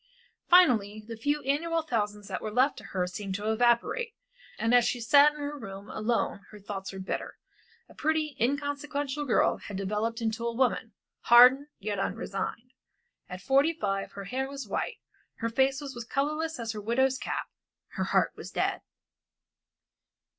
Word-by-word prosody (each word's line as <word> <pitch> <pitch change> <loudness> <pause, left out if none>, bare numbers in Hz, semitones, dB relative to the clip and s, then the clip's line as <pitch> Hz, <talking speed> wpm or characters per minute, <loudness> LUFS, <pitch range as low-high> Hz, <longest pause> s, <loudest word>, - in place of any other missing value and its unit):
Finally, 220 - +5
the 230 - -6
few 290 +6 -1
annual 325 +5 0
thousands 210 -7 -2
that - - -4
were 215 - -3
left 255 +6 +2
to - - -11
her 185 -2 -1
seemed 190 +1 -5
to 210 +2 -1
evaporate, 240 - +1 0.4
and 230 +1 +1
as 245 -1 +7
she 245 - 0
sat 285 +5 +6
in - - -11
her 290 0 -4
room 200 -6 -9
alone 225 -1 -1
her 210 - -12
thoughts 195 -1 -6
were 195 - -8
bitter. 190 0 -4 0.5
The - - -16
pretty 310 -1 -1
inconsequential 285 +2 -1
girl 250 - +3
had 200 - -7
developed 210 +4 -2
into 225 0 -2
a 235 - -3
woman, 235 -3 0 0.3
hardened 250 +4 +8
yet 205 -1 -3
unresigned. 225 +6 -4 0.6
At 180 +1 -7
forty 275 - +3
five 195 -10 -3
her 200 - -7
hair 260 +6 -3
was 275 -4 -7
white, 205 - -2 0.4
her 230 - -2
face 265 +3 +2
was 280 -2 -6 0.2
colorless 305 +4 -1
as 230 -1 -3
her 215 -2 -6
widow's 260 +5 +1
cap, - - -3 0.4
her - - -3
heart - - +2
was - - -8
dead. - - -1
240 Hz, 165 wpm, -28 LUFS, 210-285 Hz, 0.6 s, hardened